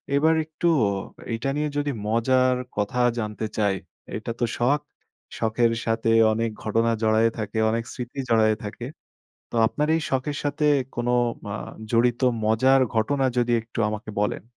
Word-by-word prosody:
এবার 160 +3 +4
একটু 160 +2 -2 0.7
এটা 115 +4 -2
নিয়ে 150 0 0
যদি 145 0 0 0.2
মজার 130 +3 +3 0.2
কথা 105 +5 -1 0.2
জানতে 105 0 -3
চাই, 100 -2 +2 0.4
এটা 110 +2 -5
তো 120 - +2
শখ। 135 +5 +2 0.6
শখের 115 +1 +2
সাথে 115 0 0 0.2
অনেক 115 +1 0
ঘটনা 115 +2 +1
জড়ায়ে 110 +1 +3
থাকে, 110 0 -4
অনেক 115 +1 0
স্মৃতি 125 +2 -6
জড়ায় 110 -1 +4
থাকে। 105 +3 -6 0.6
তো - - -7
আপনার 150 +6 -1
এই 165 - 0
শখের 135 +2 -1
সাথে 145 +1 0 0.3
কোন 120 0 -2 0.4
আ - - -3 0.4
জড়িত 120 0 +3 0.3
মজার 130 +5 +4 0.2
ঘটনা 135 +5 +1
যদি 120 0 +2
একটু 115 +1 -8
আমাকে 110 +2 -6
বলেন। 105 - -1
115 Hz, 150 wpm, -24 LUFS, 110-135 Hz, 0.7 s, এবার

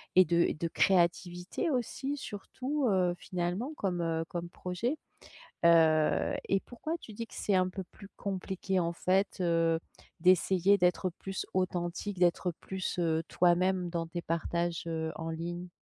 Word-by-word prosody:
et 185 0 +8
de 170 +1 +1
et - - +2
de 165 +2 -2
créativité 180 - +1
aussi 265 +2 -2
surtout, 265 +5 -3
heu, 180 -3 +2
finalement 180 - -3
comme, 180 -3 -1
heu, 165 -1 -1
comme 175 0 -4
projet. 180 - -2 0.7
Heu 160 -2 +5 0.2
et 195 - +3
pourquoi 250 +6 -5
tu 220 - -11
dis 230 +2 -5
que - - -13
c'est 205 - 0
un 185 0 +3
peu 190 +1 -5
plus 200 -2 -13
compliqué 190 -1 -2
en 170 -1 0
fait, 190 +3 +1
heu, 165 -1 +2 0.4
d'essayer 185 +2 +4
d'être 180 +1 +2
plus 195 0 -4
authentique 185 +2 -1
d'être 180 0 +3
plus, 190 -1 -4
heu, 160 -2 +2
toi-même 180 +1 +2
dans 165 -1 -2
tes 170 +1 -5
partages, 170 0 -1
heu, 160 -1 -2
en 165 0 -4
ligne? 175 +2 -4
180 Hz, 155 wpm, -31 LUFS, 170-195 Hz, 0.7 s, et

